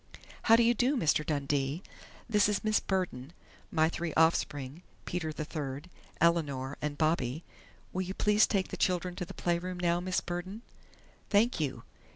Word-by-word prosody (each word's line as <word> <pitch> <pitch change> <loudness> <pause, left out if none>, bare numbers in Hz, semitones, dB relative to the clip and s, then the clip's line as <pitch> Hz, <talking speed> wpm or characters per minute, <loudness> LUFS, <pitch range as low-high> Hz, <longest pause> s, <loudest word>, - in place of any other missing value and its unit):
"How 225 - +6
do 235 - +5
you 235 +1 +5
do, 255 +4 +2
Mr. 155 -5 +2
Dundee?... 145 +2 -1 0.4
This 210 -3 +3
is 205 - -1
Miss 215 0 +3
Burden.... 175 -7 -2 0.4
My 160 -1 +3
three 170 -1 -3
offspring 150 -2 +1 0.2
Peter 160 -3 -2
the 155 0 -5
third, 150 +2 -5 0.3
Eleanor, 145 -5 +1
and 150 -1 -3
Bobby.... 155 -2 0 0.5
Will 185 - -1
you 185 +1 -4
please 210 +1 +4
take 195 -3 0
the - - -5
children 180 -1 0
to 180 - -3
the - - -10
playroom 175 +1 -1
now, 175 -1 +2
Miss 180 +1 0
Burden?... 185 +6 -5 0.7
Thank 220 +2 +3
you!... 130 -6 -2
170 Hz, 165 wpm, -31 LUFS, 150-190 Hz, 0.7 s, How